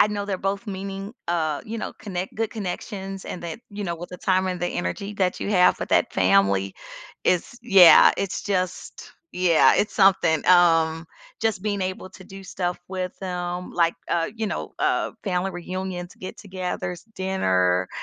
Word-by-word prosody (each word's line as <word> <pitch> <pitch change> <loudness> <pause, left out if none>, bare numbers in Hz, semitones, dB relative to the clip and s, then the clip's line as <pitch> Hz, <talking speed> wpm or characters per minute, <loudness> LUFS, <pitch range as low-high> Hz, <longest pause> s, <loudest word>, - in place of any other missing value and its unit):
I - - +7
know 205 -1 -3
they're 195 -2 -3
both 195 +4 -2
meaning, 195 +1 -5 0.2
uh, 155 -4 0
you 225 +1 -5
know, - - -5
connect 185 -2 -5
good 225 0 -2
connections 195 -2 -5
and 175 - -6
that, 170 +5 -6
you 205 0 -5
know, 170 -2 -2
with 175 +2 -9
the 180 - -7
time 190 -1 +1
and 180 -1 -3
the 175 - 0
energy 90 - -3
that 185 -2 0
you - - -2
have 180 -3 +4
with - - -3
that - - +3
family. 100 +1 +2 0.5
It's 180 +6 +1
yeah, 195 -7 +8
it's 195 -2 -3
just, 185 -3 -3 0.2
yeah, 180 -3 +4
it's 210 - 0
something, 190 -6 +4
um, 165 -2 +4 0.3
just 220 -4 0
being 205 -1 -1
able 185 0 -4
to 190 0 -14
do 195 0 -11
stuff 180 -1 -3
with 185 -1 -3
them 180 -1 -4
like, 170 -1 +2
uh, 165 -1 0
you 225 -1 -2
know, - - -4
uh, - - 0
family 190 -1 -1
reunions, 180 0 -5
get-togethers, 185 -2 -5
dinner, 95 - +1
185 Hz, 175 wpm, -24 LUFS, 175-195 Hz, 0.5 s, yeah